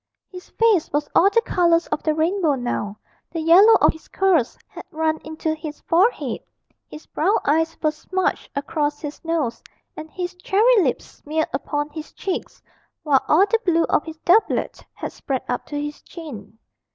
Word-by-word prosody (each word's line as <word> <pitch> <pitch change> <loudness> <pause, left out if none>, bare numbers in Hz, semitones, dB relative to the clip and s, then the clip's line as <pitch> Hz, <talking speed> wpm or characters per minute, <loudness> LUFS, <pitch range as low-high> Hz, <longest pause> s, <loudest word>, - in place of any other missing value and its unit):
His 365 -1 -11
face 445 -8 +2
was 295 +1 -1
all 390 - +5
the 460 +3 +2
colours 340 -1 +2
of - - -2
the 310 -1 0
rainbow 325 -1 +1
now; 225 -5 -3 0.3
the 330 - -5
yellow 360 +8 +7
of - - +5
his 320 - -16
curls 370 -10 +1
had - - -10
run 315 0 -1
into 315 0 -3
his 310 -1 -7
forehead, 375 +9 +1 0.5
his 305 - -11
brown 385 +7 +1
eyes 325 +3 +1
were 310 - +3
smudged 370 +5 -2
across 290 +1 -2
his 295 -1 -7
nose, 310 -9 -2 0.3
and 310 0 -8
his 355 +2 -5
cherry 410 +5 +3
lips 265 -8 -1
smeared 315 +2 -3
upon 290 +2 -2
his 310 +1 -9
cheeks, 380 -3 -5 0.4
while 280 -4 +3
all 355 +6 +5
the 450 +3 +1
blue 335 -3 +2
of - - +2
his 320 -1 -8
doublet 405 +6 +2
had - - -5
spread 265 -2 -4
up 245 - -3
to 290 - -4
his 295 0 -5
chin. 225 - -10
320 Hz, 175 wpm, -22 LUFS, 295-360 Hz, 0.5 s, yellow